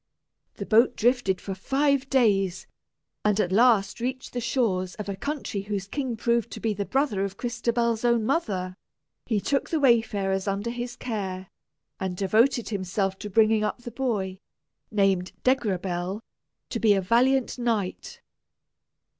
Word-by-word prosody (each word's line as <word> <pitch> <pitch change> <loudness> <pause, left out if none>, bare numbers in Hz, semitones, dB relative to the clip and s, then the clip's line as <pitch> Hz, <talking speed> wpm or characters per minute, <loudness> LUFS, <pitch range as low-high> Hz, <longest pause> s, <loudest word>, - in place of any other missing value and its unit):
The - - -5
boat 230 +3 +4
drifted 235 -6 +2
for 195 - -5
five 275 +6 +1
days, 195 -8 +2 0.6
and 210 0 +2
at 180 -3 +1
last 210 -1 +4
reached 255 +2 -4
the 245 - -2
shores 215 -7 0
of 210 - -6
a 200 - -3
country 275 -3 -3
whose 200 -1 -3
king 250 +2 -3
proved 235 0 +1
to - - -6
be 220 -1 0
the 200 0 -3
brother 260 -7 0
of 200 0 -4
Crystabell's 235 -1 -1
own 235 -2 +2
mother. 200 - -1 0.5
He 220 -3 +1
took 275 +7 -1
the 320 - 0
wayfarers 210 -7 +2
under 200 +4 -1
his 240 0 -5
care, 190 -7 -4 0.5
and 185 -2 -3
devoted 225 +6 +2
himself 195 -1 -2
to 210 - -6
bringing 215 +1 +3
up 215 +3 -3
the 240 - -7
boy, 210 -7 -2 0.5
named 195 -3 +1
Degrabell, 190 -6 0 0.5
to - - -2
be 215 -3 +4
a 195 - +1
valiant 250 +6 +2
knight. 225 -6 -2
215 Hz, 150 wpm, -26 LUFS, 195-245 Hz, 0.6 s, boat